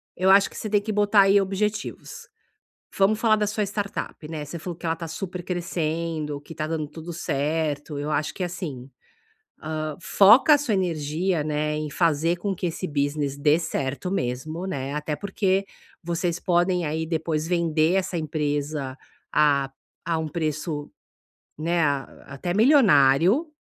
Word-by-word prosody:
Eu 185 +1 +2
acho 195 +1 +6
que - - -16
você 215 - -4
tem 205 -1 +3
que 215 +1 -4
botar 205 0 +4
aí 195 +1 +5
objetivos. 205 +2 -3 0.7
Vamos 205 +2 +3
falar 220 -2 +4
da 210 -1 0
sua 210 0 -1
startup, 200 -5 -4
né, 155 -2 -5
você 170 +4 -7
falou 175 0 -6
que 170 - -10
ela 165 0 +1
tá 165 0 -6
super 180 +1 -5
crescendo, 165 -4 -3
que 165 - -11
tá 155 - -2
dando 155 -2 -2
tudo 165 +3 -8
certo, 150 -1 -2
eu 145 +1 -3
acho 150 0 -1
que, 185 - -4
assim, 160 -8 -5 0.7
hã, 155 -1 -3
foca 235 - +6
a - - +4
sua 270 -7 -1
energia, 165 -1 0
né, 150 0 -1
em 150 -1 -3
fazer 165 +1 +1
com 195 +2 -2
que 180 0 -3
esse 170 +2 -3
business 145 -2 -1
dê 150 +2 +3
certo 145 -1 -3
mesmo, 155 +5 -3
né, 140 -6 -3
até 150 0 -2
porque 195 +1 0 0.4
vocês 170 0 -1
podem 175 0 +1
aí 160 +2 -2
depois 160 -1 -1
vender 165 -1 +2
essa 190 -2 0
empresa 145 -3 -2 0.4
a 145 -2 +3 0.4
a 165 -1 +1
um 160 -1 -3
preço, 155 -1 -3 0.7
né, 170 +2 0
ah, 140 -2 -2
até 140 +6 -4
milionário, 205 - +5
165 Hz, 165 wpm, -24 LUFS, 150-190 Hz, 0.7 s, acho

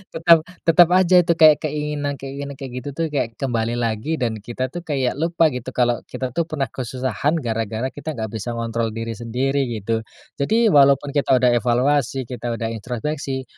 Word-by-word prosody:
Tetap 165 0 +6 0.2
tetap 170 0 +6
aja 185 -1 +5
itu 170 -1 +2
kayak 155 -2 +7
keinginan-keinginan 145 -2 -4
kayak 135 -2 -8
gitu 125 - -7
tuh, 165 +1 -1
kayak 115 -6 -2
kembali 120 -3 -1
lagi 115 +6 -1
dan 115 -6 -2
kita 120 +4 -4
tuh 175 - -5
kayak 140 -7 -1
lupa 165 -1 +2
gitu 125 0 -6
kalau 120 -1 +2
kita 130 -2 -4
tuh 165 +5 -1
pernah 145 -4 -3
kesusahan 130 +3 -2
gara-gara 115 +2 -2
kita 150 +1 -6
nggak 110 -2 -4
bisa 115 +2 -4
ngontrol 115 -1 -2
diri 115 0 -4
sendiri, 125 +5 -1
gitu. 110 +2 -1 0.4
Jadi 220 +9 +3
walaupun 140 0 +4
kita 140 -2 +2
udah 125 -1 +4
evaluasi 130 +3 +1
kita 120 -1 -3
udah 115 -1 -3
introspeksi, 130 +4 -4
130 Hz, 170 wpm, -21 LUFS, 115-150 Hz, 0.4 s, kayak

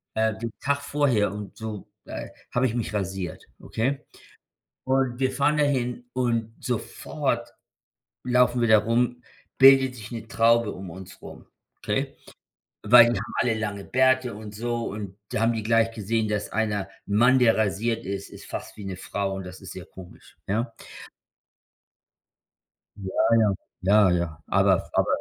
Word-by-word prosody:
äh, 110 -1 +1
den 115 0 -4
Tag 140 +1 0
vorher 140 -8 +1
und 105 -1 -8
so, 110 -3 -6 0.2
äh, - - -6 0.2
habe 125 +1 +2
ich 115 - -3
mich 115 -3 -3
rasiert, 95 -4 -3 0.2
okay? 135 +5 -2 0.8
Und 130 -2 +1
wir 130 -1 +1
fahren 140 +3 +2
dahin 125 -4 0
und 115 -3 0
sofort 120 -3 -2 0.7
laufen 125 -1 +3
wir 115 - +3
da 110 -1 +7
rum, 120 +3 0 0.4
bildet 135 -1 +7
sich 110 0 -10
'ne 115 -1 -6
Traube 115 0 +3
um 95 0 -8
uns 95 +1 -11
rum, - - -11 0.3
okay? - - -2 0.7
Weil 115 +3 +9
die - - -1
haben - - -7
alle 120 - +2
lange 105 -2 -4
Bärte 130 -1 +2
und 105 -1 -9
so 120 +1 -2
und 100 -2 -6
da - - -2
haben 115 +1 +3
die 110 - -2
gleich 115 +1 +3
gesehen, 110 0 -1
dass 105 -1 -2
einer 105 -2 0 0.2
'n 100 - -1
Mann, 125 +3 +5
der 120 -2 +4
rasiert 110 +2 0
ist, 100 0 -4
ist - - -12
fast - - -6
wie 105 - -8
'ne 95 -1 -4
Frau 95 +1 -3
und 95 - -5
das 90 +1 -10
ist 95 - -9
sehr 95 - -8
komisch, 95 -1 -14
ja? 115 +4 -1 2.3
Ja, 95 -1 -5 0.3
ja, 110 -2 +4 0.3
ja, 100 +1 +5
ja. 85 -3 -1
Aber - - +2
aber - - +2
115 Hz, 160 wpm, -25 LUFS, 100-125 Hz, 2.3 s, Weil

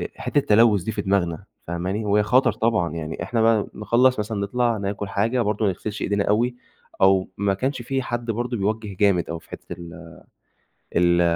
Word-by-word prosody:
آآ - - -3
حِتّة - - -1
التلوّث 110 -6 +4
دي 110 - -3
في 105 - -3
دماغنا 90 -5 0 0.2
فاهماني، 90 +5 -2
وهي 105 0 +3
خطَر 120 +3 +3
طبعًا، 110 -6 0
يعني 80 -1 -5
إحنا 115 -3 0
بقى 110 -2 +3
نخلّص 120 +4 +2
مثلًا 105 0 -2
نطلَع 120 +3 0
ناكل 100 0 -4
حاجة 110 +5 0
برضه 105 +1 -1
ما 100 - +3
نغسِلش 105 +3 -6
إيدينا 100 0 0
أوي 120 +4 +1 0.5
أو 95 -1 +4
ما 100 -1 +1
كانش 130 +4 -2
فيه 135 +2 -2
حد 120 -1 -3
برضه 120 +2 -2
بيوجّه 105 -1 -2
جامد 95 -5 +2
أوي 85 0 -4
في - - -24
حِتّة - - -9
ال 85 -1 -10 0.8
ال 85 0 +4
105 Hz, 190 wpm, -23 LUFS, 95-115 Hz, 0.8 s, التلوّث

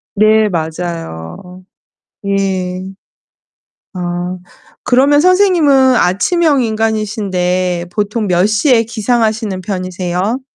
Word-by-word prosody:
네 215 +1 +4
맞아요. 165 - -6 0.6
예. 190 -2 -2 1.1
아 180 0 -4 0.5
그러면 280 +4 +3
선생님은 330 -9 +4
아침형 285 - +2
인간이신데 200 -6 -1
보통 210 +2 -2
몇 180 +1 +2
시에 225 +2 +3
기상하시는 220 -3 -1
편이세요? 185 +3 -3
200 Hz, 200 characters per minute, -14 LUFS, 180-230 Hz, 1.1 s, 네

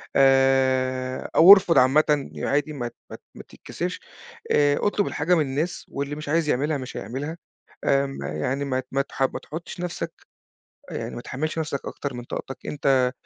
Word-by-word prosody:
آآ 130 -1 +2
أو 175 +4 +9
ارفُض 185 -4 +4
عامةً 145 +2 +3
ي - - -5
عادي 145 +2 0
ما 120 -4 -4
ت - - -12
ما - - -7
ت - - -15
ما - - -10
تتكسفش. - - -6 0.5
آآ، 145 -1 +4
اطلُب 205 -1 0
الحاجة 170 +5 +1
من 160 - +2
الناس 145 +5 -2
واللي 140 +1 -4
مش 150 -1 -7
عايز 160 -1 +1
يعملها 145 +3 +1
مش 130 -2 -7
هيعملها، 140 +10 -5 0.5
آمم 135 - +1
يعني 100 - -2
ما 130 -1 -1
ت 130 - -8
ما 135 +1 +1
تح 140 - -8
ما - - 0
تحُطّش 165 +3 -8
نفسك 170 -1 -4 0.8
أ - - -7
يعني - - -4
ما - - -5
تحمّلش 155 +5 -4
نفسك 150 -3 -3
أكتر 140 -3 -5
من 120 0 -7
طاقتك، 135 - -6
أنت 130 -3 +2
140 Hz, 185 wpm, -24 LUFS, 130-155 Hz, 0.8 s, أو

